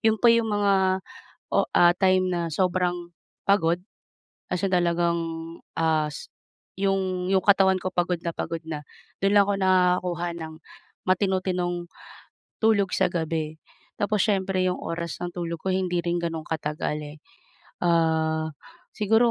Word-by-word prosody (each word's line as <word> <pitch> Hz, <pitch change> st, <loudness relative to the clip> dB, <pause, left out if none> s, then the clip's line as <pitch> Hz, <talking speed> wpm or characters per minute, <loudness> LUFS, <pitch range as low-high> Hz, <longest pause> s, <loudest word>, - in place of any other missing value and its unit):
'Yon 220 Hz, -1 st, +3 dB
pa 235 Hz, +1 st, +5 dB
'yong 230 Hz, -1 st, +2 dB
mga 205 Hz, -1 st, +2 dB, 0.8 s
o -, -, +2 dB
ah, 175 Hz, 0 st, +7 dB
time 185 Hz, 0 st, +3 dB
na 175 Hz, -, 0 dB
sobrang 175 Hz, 0 st, 0 dB, 0.3 s
pagod 175 Hz, -4 st, +3 dB, 0.7 s
kasi 180 Hz, +2 st, -1 dB
talagang 170 Hz, -1 st, +2 dB, 0.6 s
as 155 Hz, -2 st, 0 dB, 0.5 s
'yong 190 Hz, -2 st, 0 dB
'yong 190 Hz, -1 st, +3 dB
katawan 195 Hz, -2 st, +5 dB
ko 185 Hz, -, -3 dB
pagod 175 Hz, 0 st, +1 dB
na 170 Hz, -, -1 dB
pagod 165 Hz, 0 st, -3 dB
na 155 Hz, -2 st, -3 dB, 0.4 s
do'n 195 Hz, 0 st, +3 dB
lang 200 Hz, -, +7 dB
ako 205 Hz, -, +1 dB
nakakakuha 180 Hz, -2 st, +2 dB
ng 160 Hz, -1 st, -7 dB, 0.5 s
matino-tinong 185 Hz, -2 st, +1 dB, 0.8 s
tulog 205 Hz, -4 st, +3 dB
sa -, -, +3 dB
gabi. 160 Hz, -2 st, -2 dB, 0.4 s
Tapos 210 Hz, 0 st, +1 dB
siyempre 195 Hz, -3 st, +1 dB
'yong 180 Hz, -, -1 dB
oras 170 Hz, -1 st, -4 dB
ng 175 Hz, -, -3 dB
tulog 170 Hz, -2 st, -4 dB
ko 190 Hz, -, -1 dB
hindi 180 Hz, -2 st, 0 dB
rin 175 Hz, 0 st, 0 dB
gano'n 165 Hz, -2 st, -3 dB
katagal, 150 Hz, -1 st, -2 dB, 0.2 s
eh. -, -, -20 dB, 0.6 s
Ah, 160 Hz, -2 st, +2 dB, 0.4 s
siguro 225 Hz, +2 st, +3 dB
180 Hz, 135 wpm, -25 LUFS, 170-195 Hz, 0.8 s, ah